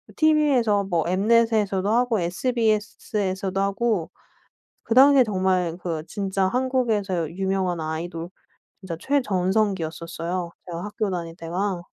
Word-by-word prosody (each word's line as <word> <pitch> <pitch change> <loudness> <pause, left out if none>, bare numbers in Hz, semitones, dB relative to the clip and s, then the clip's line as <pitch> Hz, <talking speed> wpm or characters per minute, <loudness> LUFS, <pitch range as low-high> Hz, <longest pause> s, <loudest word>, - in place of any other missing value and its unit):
TV에서 275 -10 +3
뭐 170 -4 0
엠넷에서도 210 -1 +2
하고 235 -3 +2
SBS에서도 205 -2 -1
하고 200 -2 0 0.7
그다음에 265 +3 +6
정말 185 -5 0
그 165 -3 -3
진짜 195 -1 -1
한국에서 220 - 0
유명한 190 -1 -1
아이돌 165 +2 -4 0.5
진짜 185 -3 -5
최전성기였었어요 180 - -1 0.2
제가 170 0 -5
학교 210 0 -2
다닐 170 -3 -4
때가. 180 +2 -3
195 Hz, 285 characters per minute, -24 LUFS, 175-225 Hz, 0.7 s, 그다음에